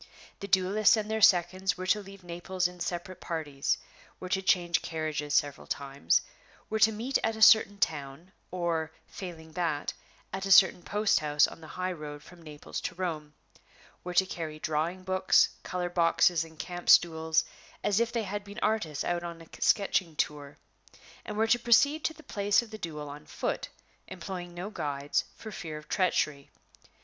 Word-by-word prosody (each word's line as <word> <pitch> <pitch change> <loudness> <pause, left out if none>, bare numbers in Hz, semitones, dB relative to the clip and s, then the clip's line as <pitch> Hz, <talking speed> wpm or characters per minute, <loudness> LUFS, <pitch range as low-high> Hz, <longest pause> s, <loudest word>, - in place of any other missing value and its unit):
The 200 - -6
duelists 200 +3 +4
and 215 0 -3
their 220 0 -1
seconds 185 0 +4
were 185 - -5
to 210 +3 +2
leave 195 -1 -13
Naples 175 +1 -2
in 180 0 -12
separate 175 +1 -4
parties; 150 -5 -2 0.4
were 185 - -7
to 190 - +1
change 175 -3 +2
carriages 155 -3 -3
several 145 -1 0
times; 135 -11 0 0.5
were 220 - 0
to 220 +1 +6
meet 235 +6 -1
at 225 0 0
a 220 - -8
certain 205 -2 +7
town, 155 0 -3 0.2
or, 170 -3 -1 0.2
failing 165 -4 -9
that, 160 -3 -2 0.4
at 190 +1 -3
a - - -2
certain 190 -2 +7
post 210 +3 +1
house 150 -1 +3
on - - -11
the 160 - -10
high 185 0 -1
road 150 -3 -8
from 180 -2 -15
Naples 150 -2 -7
to 180 - -4
Rome; 155 -5 -4 0.7
were 180 0 -6
to 190 - +5
carry 160 -4 -5
drawing 160 +4 -2
books, 185 0 +4
color 180 -1 -3
boxes, 170 -1 +3
and 160 -1 -14
camp 175 +3 -5
stools, 160 -1 +5 0.4
as 205 +1 +2
if 235 0 +1
they 230 -1 -1
had 205 +1 -4
been 205 0 -11
artists 210 -10 0
out 175 0 -1
on 170 -1 -7
a 165 - -13
sketching 185 -5 +2
tour; 145 -1 -3 0.7
and 210 - -5
were 220 - +3
to 235 +2 +3
proceed 285 +6 +4
to 320 - 0
the 315 - -15
place 205 0 +1
of 225 - -14
the 215 - -8
duel 150 -4 -5
on 145 +1 -10
foot, - - -3 0.4
employing 180 -1 -7
no 185 +4 -5
guides, 145 -6 -2
for 220 - -9
fear 160 -6 -6
of 150 - -12
treachery. 155 -7 0
175 Hz, 180 wpm, -29 LUFS, 155-195 Hz, 0.7 s, certain